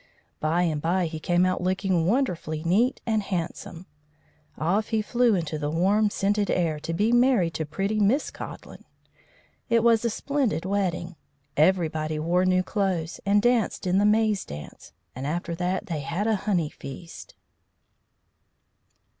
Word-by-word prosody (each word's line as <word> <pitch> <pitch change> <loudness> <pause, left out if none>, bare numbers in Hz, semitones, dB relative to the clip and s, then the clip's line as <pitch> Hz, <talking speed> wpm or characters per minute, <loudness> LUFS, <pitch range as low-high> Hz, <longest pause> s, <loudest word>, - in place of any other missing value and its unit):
By 165 +3 +1
and 155 -4 -1
by 175 +3 +1
he 160 -1 -5
came 175 +3 +2
out 185 -1 0
looking 185 -2 0
wonderfully 180 - -1
neat 210 +10 +2
and 220 -2 +1
handsome. 180 -2 -5 0.7
Off 195 +7 0
he 220 - 0
flew 235 +1 +2
into 160 -3 -2
the 145 -1 -2
warm, 195 +7 +2
scented 205 +1 0
air 165 -4 0
to 165 - -5
be 210 +7 +1
married 240 -8 +3
to 160 - -3
pretty 195 +7 -1
Miss 220 +9 +2
Codlin. - - -9 0.9
It 230 -1 +3
was 230 -1 +4
a 235 - +1
splendid 260 - -1
wedding. 180 -3 -2 0.4
Everybody 155 -2 +1
wore 175 +4 +1
new 185 0 +3
clothes 185 -5 -2
and 205 +1 +4
danced 240 -4 +1
in 185 +1 +2
the 205 - +3
maze 215 -1 +2
dance, 75 +1 -10 0.2
and 130 +3 -4
after 170 +2 -3
that 180 +3 -2
they 165 -7 -3
had 165 +8 -3
a 220 -1 +2
honey 170 -6 +1
feast. 165 +5 -10
185 Hz, 155 wpm, -25 LUFS, 165-210 Hz, 0.9 s, was